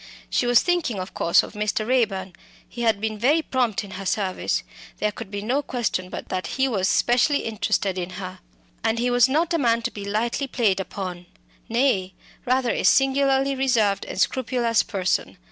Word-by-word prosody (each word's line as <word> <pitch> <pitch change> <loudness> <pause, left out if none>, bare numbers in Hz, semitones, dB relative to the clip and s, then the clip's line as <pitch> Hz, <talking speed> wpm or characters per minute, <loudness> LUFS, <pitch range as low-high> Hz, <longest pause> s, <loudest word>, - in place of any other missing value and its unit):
She 245 - +1
was 245 0 +5
thinking, 345 - 0
of 185 - -6
course, 170 - +3
of - - -9
Mr. 210 +1 -1
Raeburn. 200 -7 0 0.3
He 240 - -8
had 225 -3 +2
been 215 0 -3
very 295 +8 +3
prompt 245 -7 0
in 200 - -10
her 190 +1 -7
service. 190 -1 -1 0.3
There 210 - 0
could 215 0 -9
be 205 0 -5
no 255 +6 +1
question 230 -9 -2
but - - -7
that 185 -2 -2
he 265 0 +3
was 200 -6 0
specially 250 +4 +3
interested 200 -3 -1
in 175 0 -4
her. 185 -1 -7 0.4
And 225 0 +1
he 245 +1 0
was 245 +1 +5
not 325 +5 +1
a 335 - +2
man 230 -3 +2
to 240 - -2
be 205 - -7
lightly 230 +7 -1
played 220 -7 +1
upon 185 -1 -6 0.4
nay, 225 -6 +1 0.3
rather 255 -1 +2
a - - -1
singularly 270 0 +3
reserved 240 -7 +1
and - - -6
scrupulous 240 0 +1
person. 190 -2 -2
225 Hz, 185 wpm, -24 LUFS, 195-260 Hz, 0.4 s, was